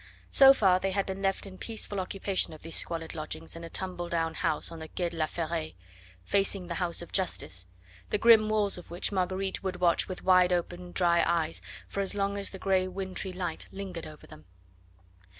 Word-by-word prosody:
So 270 -1 +9
far 190 -8 +4
they 195 - 0
had 195 +1 0
been 190 0 -5
left 195 0 0
in 185 -1 -10
peaceful 215 -3 -3
occupation 190 -1 0
of 155 - -12
these 165 0 -3
squalid 165 -1 -3
lodgings 155 +1 -6
in 165 - -8
a 165 - -7
tumble 175 -1 -4
down 165 -1 0
house 155 +1 -1
on 165 - -8
the 160 - -7
Quai 175 +2 -2
de 170 - -10
la 155 -1 +1
Ferraille, 155 - -3 0.5
facing 195 - +1
the 175 - -4
house 175 -1 -1
of 170 - -12
Justice, 95 - -2 0.4
the - - +1
grim 220 -1 +6
walls 205 -3 +1
of 175 - -13
which 175 +4 -2
Marguerite 190 0 -1
would 190 -2 -2
watch 175 -1 +2
with 185 - -6
wide 185 -1 +5
open 175 0 -2
dry 170 -2 +3
eyes 165 -1 0 0.3
for - - -5
as 195 0 +1
long 200 0 0
as 200 0 -2
the 190 - -8
grey 190 -1 +2
wintry 190 0 -2
light 180 -3 -4
lingered 190 -4 -6
over 155 -1 -12
them. 80 - -14
185 Hz, 205 wpm, -29 LUFS, 170-195 Hz, 0.5 s, So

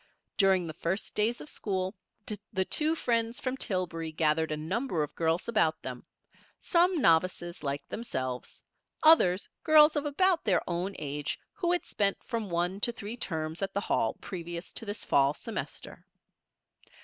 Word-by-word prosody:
During 190 -3 +4
the 160 - -5
first 180 +6 -2
days 225 +3 +1
of - - -9
school 190 -7 -2 0.6
the 190 -2 0
two 310 - +2
friends 230 -4 0
from 255 0 -2
Tillbury 175 -8 -3
gathered 155 0 +1
a 155 - -1
number 180 - -1
of 150 - -6
girls 165 +1 0
about 215 -9 +1
them; - - -7 0.5
some 350 0 +2
novices 175 - +2
like 140 -1 -3
themselves; 130 - -4 0.4
others, 205 - +6 0.2
girls 305 -1 +7
of 295 0 0
about 355 +4 +2
their 190 -5 +1
own 180 +3 -2
age 145 0 -3 0.2
who 350 -2 0
had 355 - 0
spent 200 -1 +1
from 225 -4 -3
one 175 +3 0
to 235 - +1
three 225 -1 -6
terms 160 -7 -3
at 195 - -2
the 200 - +1
Hall 110 - 0
previous 170 -1 -6
to 225 - -2
this 205 +1 -4
fall 140 +1 +3
semester. 225 +4 -6
190 Hz, 160 wpm, -30 LUFS, 165-235 Hz, 0.6 s, girls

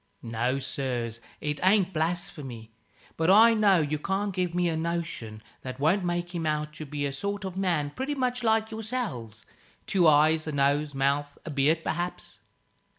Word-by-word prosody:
"No, 120 +3 -1
sirs. 120 -4 -3 0.2
It 150 -1 -2
ain't 190 -1 +4
blasphemy. 155 -8 -3 0.5
But 160 +2 +1
I 225 +4 +8
know 200 -5 +4
you 150 0 -1
can't 195 +4 -1
give 180 -2 -1
me 180 0 +2
a 165 - 0
notion 160 -10 -4 0.2
that 130 0 -7
won't 170 +7 +2
make 175 0 -2
him 165 -2 -2
out 150 0 -1
to 155 - -7
be 145 0 -3
a 140 - -2
sort 200 +6 -3
of 185 -1 -5
man, 170 -7 0
pretty 270 - -3
much 250 -2 -1
like 220 -1 +2
yourselves 210 - -5 0.4
two 180 -4 +3
eyes, 155 +1 +4
a - - -1
nose, 145 +1 +1
mouth, 140 +1 0
and 160 - -5
beard 150 +4 +2
perhaps. 175 +2 -4
160 Hz, 170 wpm, -27 LUFS, 140-190 Hz, 0.5 s, I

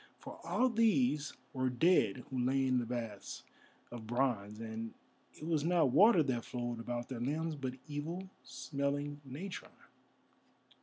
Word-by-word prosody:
For - - -10
all 255 - +2
these 225 - +3 0.2
were 130 -1 +1
dead 125 - +3
who 130 - -1
lay 135 +2 +2
in 130 -1 +3
the 120 - -3
baths 115 -4 -5 0.5
of 115 -2 -7
bronze, 115 -4 0
and 115 0 -5 0.4
it 155 - -8
was 160 -3 +1
not 165 -5 +3
water 185 - +7
that 125 -4 -1
flowed 120 -1 -3
about 120 +1 -3
their 130 -3 -5
limbs, 155 +5 -1
but 130 -3 -4
evil 160 +6 -4
smelling 145 0 -3
natron. 150 +9 -6
135 Hz, 145 wpm, -35 LUFS, 120-160 Hz, 0.5 s, water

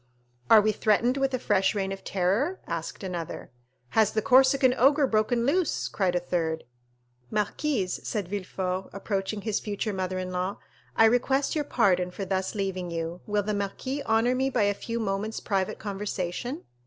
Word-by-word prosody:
"Are 220 - +9
we 215 +1 +2
threatened 225 +5 +2
with 270 0 +1
a - - 0
fresh 200 -4 +1
Reign 195 -1 -1
of 195 0 -6
Terror?" 200 - 0
asked 165 +3 -5
another. 175 -4 -5 0.4
"Has 215 - +3
the 215 - +1
Corsican 260 0 +5
ogre 280 +4 +4
broken 235 0 +1
loose?" 335 +5 +1
cried 185 -3 0
a - - +3
third. 165 -2 -2 0.7
"Marquise," 210 -1 -1
said 205 -5 -3
Villefort, 185 -1 -3
approaching 200 +1 -3
his 215 -1 -1
future 210 0 -3
mother 185 -1 -2
in 185 0 -4
law, 185 +2 -2 0.4
"I 225 - +6
request 265 +4 +2
your 300 -2 -1
pardon 185 -9 +2
for 195 +2 -5
thus 190 +1 -2
leaving 190 -3 -2
you. 165 +1 -4
Will 205 -1 +1
the 210 +1 -1
marquis 205 +8 -3
honor 225 +3 +3
me 265 +1 +1
by 245 -5 +1
a 205 0 +3
few 230 +3 -4
moments' 210 +1 -2
private 195 -3 -1
conversation?" 205 - -4
205 Hz, 170 wpm, -27 LUFS, 185-240 Hz, 0.7 s, Are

